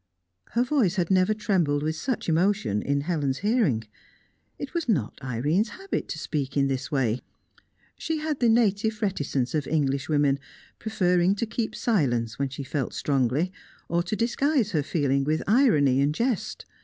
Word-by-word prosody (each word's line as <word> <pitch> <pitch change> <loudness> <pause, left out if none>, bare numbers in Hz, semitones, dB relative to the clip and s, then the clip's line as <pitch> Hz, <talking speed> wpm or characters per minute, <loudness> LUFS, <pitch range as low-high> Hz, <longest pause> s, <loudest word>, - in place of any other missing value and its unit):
Her 235 - +3
voice 250 - +1
had 180 -2 0
never 185 +2 +4
trembled 175 -9 +1
with 155 +1 -1
such 250 +8 -3
emotion 170 - +1
in 140 0 0
Helen's 145 -4 -1
hearing. 205 - +2 0.7
It - - -6
was 335 -7 -2
not 140 - 0
Irene's 145 - 0
habit 390 +1 -3
to - - -5
speak 145 -3 -3
in 140 - +4
this 135 +2 -3
way. 125 -4 0 0.8
She 320 -1 -2
had 305 -2 -2
the 240 - +3
native 220 -1 +2
reticence 140 -10 -1
of 150 -3 -1
English 140 -3 0
women, 145 -2 +2 0.4
preferring 180 -3 +2
to 220 - -1
keep 225 0 -3
silence 120 - 0
when 140 -1 0
she 140 +1 -6
felt 135 -1 -3
strongly, 140 +5 +1 0.4
or 170 0 +2
to 175 +5 -3
disguise 240 +1 +1
her 155 -5 +1
feeling 140 -2 0
with 155 +3 0
irony 175 - +4
and 145 +2 +1
jest. 235 -2 -2
165 Hz, 165 wpm, -26 LUFS, 140-215 Hz, 0.8 s, never